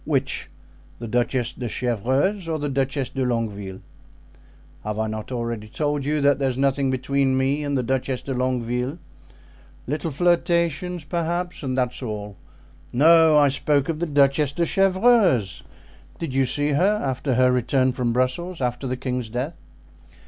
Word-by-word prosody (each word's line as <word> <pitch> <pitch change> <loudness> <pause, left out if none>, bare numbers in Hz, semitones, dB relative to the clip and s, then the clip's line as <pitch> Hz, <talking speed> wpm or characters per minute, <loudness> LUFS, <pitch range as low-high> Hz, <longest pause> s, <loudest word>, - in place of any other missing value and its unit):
"Which—the 115 - -4
Duchess 120 +1 0
de 120 -2 -5
Chevreuse 130 - 0
or 160 - 0
the 145 -1 -3
Duchess 135 0 -1
de 135 - -2
Longueville?" 105 -6 -3 1.0
"Have 105 0 -3
I 110 - 0
not 110 +2 -5
already 115 -3 -3
told 145 +4 -2
you 150 +1 0
that 140 -1 +3
there 135 -1 +1
is 125 - -4
nothing 135 0 +1
between 130 +1 +1
me 135 +3 +1
and 145 -1 -1
the 130 - 0
Duchess 130 +1 -2
de 135 - -3
Longueville? 125 +2 -1 0.9
Little 150 +4 -2
flirtations, 170 +1 +1
perhaps, 175 +3 -3
and 130 -3 -3
that's 125 0 -1
all. 105 -4 -5 0.6
No, 160 +3 +6
I 145 -1 +5
spoke 140 +1 +1
of 160 -2 -2
the 175 - -1
Duchess 140 0 +3
de 170 +3 0
Chevreuse; 190 - +3 0.6
did 165 -6 -4
you 135 -1 +2
see 145 +2 0
her 190 +9 +2
after 130 0 -1
her 125 +1 +4
return 130 +1 +2
from 125 -2 -1
Brussels, 130 +9 -1
after 125 +1 -2
the 130 0 -2
king's 125 -2 -3
death?" 125 +8 -3
135 Hz, 155 wpm, -23 LUFS, 125-150 Hz, 1.0 s, No